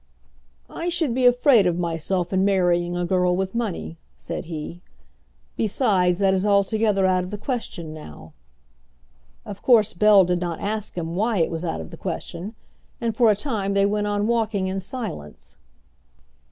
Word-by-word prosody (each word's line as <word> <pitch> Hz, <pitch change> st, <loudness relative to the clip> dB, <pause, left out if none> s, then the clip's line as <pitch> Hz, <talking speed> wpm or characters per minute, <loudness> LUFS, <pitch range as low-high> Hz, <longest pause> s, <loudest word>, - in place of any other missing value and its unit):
"I 340 Hz, +1 st, -4 dB
should 325 Hz, -7 st, 0 dB
be 250 Hz, 0 st, +3 dB
afraid 245 Hz, -4 st, +5 dB
of 175 Hz, -1 st, 0 dB
myself 175 Hz, +2 st, -2 dB
in 190 Hz, 0 st, +2 dB
marrying 175 Hz, -3 st, +1 dB
a 175 Hz, -, -1 dB
girl 180 Hz, 0 st, +2 dB
with 190 Hz, +1 st, -2 dB
money," 215 Hz, -8 st, -3 dB, 0.2 s
said -, -, -6 dB
he; 165 Hz, +1 st, -7 dB, 0.7 s
"besides, 195 Hz, -5 st, +2 dB
that 195 Hz, -1 st, +2 dB
is 190 Hz, 0 st, +1 dB
altogether 205 Hz, 0 st, +2 dB
out 185 Hz, -1 st, +2 dB
of 180 Hz, -, -7 dB
the 210 Hz, -, -5 dB
question 205 Hz, -, -5 dB
now." 150 Hz, -, -11 dB, 1.1 s
Of 205 Hz, -3 st, -8 dB
course 230 Hz, -5 st, +4 dB
Bell 200 Hz, +1 st, +6 dB
did 180 Hz, 0 st, -1 dB
not 170 Hz, -2 st, -3 dB
ask 215 Hz, 0 st, -3 dB
him 165 Hz, 0 st, -3 dB
why 220 Hz, +3 st, 0 dB
it 165 Hz, -1 st, +1 dB
was 165 Hz, 0 st, -4 dB
out 80 Hz, -, -3 dB
of 80 Hz, -, -10 dB
the -, -, -9 dB
question, 185 Hz, +6 st, -5 dB, 0.4 s
and 230 Hz, -2 st, -2 dB
for 235 Hz, -2 st, +4 dB
a 210 Hz, -, +4 dB
time 200 Hz, -4 st, -2 dB
they 200 Hz, 0 st, +4 dB
went 210 Hz, +1 st, 0 dB
on 205 Hz, 0 st, 0 dB
walking 220 Hz, -4 st, 0 dB
in 190 Hz, +1 st, -2 dB
silence. 190 Hz, -, -6 dB
195 Hz, 170 wpm, -23 LUFS, 175-215 Hz, 1.1 s, Bell